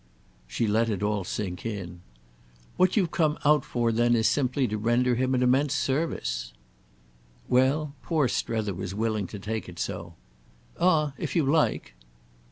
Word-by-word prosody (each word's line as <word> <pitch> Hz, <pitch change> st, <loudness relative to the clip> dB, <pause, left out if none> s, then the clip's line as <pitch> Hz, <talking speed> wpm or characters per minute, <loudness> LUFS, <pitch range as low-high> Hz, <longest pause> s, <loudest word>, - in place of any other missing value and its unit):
She 90 Hz, -, -1 dB
let 110 Hz, +2 st, +2 dB
it 105 Hz, -2 st, -2 dB
all 105 Hz, -1 st, 0 dB
sink 90 Hz, -1 st, -4 dB
in. 95 Hz, -6 st, -5 dB, 0.7 s
"What 185 Hz, +3 st, +3 dB
you've 180 Hz, -6 st, +2 dB
come 155 Hz, -2 st, +1 dB
out 150 Hz, -2 st, +5 dB
for 120 Hz, -1 st, 0 dB
then 120 Hz, +1 st, +3 dB
is 110 Hz, -1 st, +3 dB
simply 130 Hz, -1 st, +1 dB
to 105 Hz, -, -3 dB
render 120 Hz, +3 st, +2 dB
him 130 Hz, +2 st, +1 dB
an 125 Hz, -, +2 dB
immense 135 Hz, +3 st, +2 dB
service." 130 Hz, -, -2 dB, 0.9 s
Well, 140 Hz, +4 st, +2 dB
poor 155 Hz, -6 st, +1 dB
Strether 110 Hz, -4 st, -1 dB
was 95 Hz, +1 st, -5 dB
willing 110 Hz, -2 st, -1 dB
to 105 Hz, -, -8 dB
take 110 Hz, 0 st, -4 dB
it 90 Hz, -, -11 dB
so. 90 Hz, -3 st, -5 dB, 0.6 s
"Ah 155 Hz, -5 st, +3 dB
if -, -, -4 dB
you 165 Hz, -, +3 dB
like." 140 Hz, -, +1 dB
120 Hz, 160 wpm, -27 LUFS, 105-140 Hz, 0.9 s, out